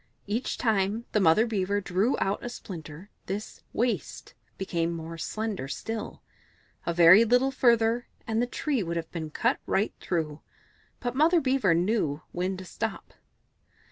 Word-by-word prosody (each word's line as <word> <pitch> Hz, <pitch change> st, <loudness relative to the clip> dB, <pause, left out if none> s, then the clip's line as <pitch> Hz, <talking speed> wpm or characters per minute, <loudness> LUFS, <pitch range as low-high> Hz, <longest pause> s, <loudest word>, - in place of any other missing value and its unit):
Each 220 Hz, +5 st, -2 dB
time 215 Hz, 0 st, +1 dB
that 215 Hz, -, +2 dB
Mother 190 Hz, +4 st, +5 dB
Beaver 205 Hz, -3 st, 0 dB
drew 195 Hz, +5 st, +1 dB
out 195 Hz, +1 st, -1 dB
a 245 Hz, -, -3 dB
splinter 175 Hz, -4 st, -9 dB, 0.2 s
this 205 Hz, +3 st, -5 dB
"waist" 240 Hz, +1 st, -2 dB, 0.2 s
became 170 Hz, -3 st, -1 dB
more 165 Hz, 0 st, -6 dB
slender 210 Hz, -3 st, -3 dB
still; 225 Hz, +9 st, -5 dB, 0.6 s
a -, -, +2 dB
very 175 Hz, +5 st, +8 dB
little 250 Hz, +4 st, +3 dB
further, 235 Hz, -2 st, +3 dB, 0.2 s
and 225 Hz, 0 st, 0 dB
the 245 Hz, -, +1 dB
tree 275 Hz, -1 st, -1 dB
would 170 Hz, -2 st, -2 dB
have 165 Hz, -1 st, -5 dB
been 160 Hz, -3 st, -4 dB
cut -, -, +1 dB
right 200 Hz, +3 st, +1 dB
through, 155 Hz, -4 st, -2 dB, 0.6 s
but 245 Hz, -1 st, -2 dB
Mother 325 Hz, +5 st, +5 dB
Beaver 260 Hz, -, +2 dB
knew 170 Hz, -5 st, 0 dB
when 185 Hz, +2 st, -2 dB
to 185 Hz, -, -8 dB
stop. 220 Hz, +4 st, -5 dB
205 Hz, 150 wpm, -28 LUFS, 170-230 Hz, 0.6 s, very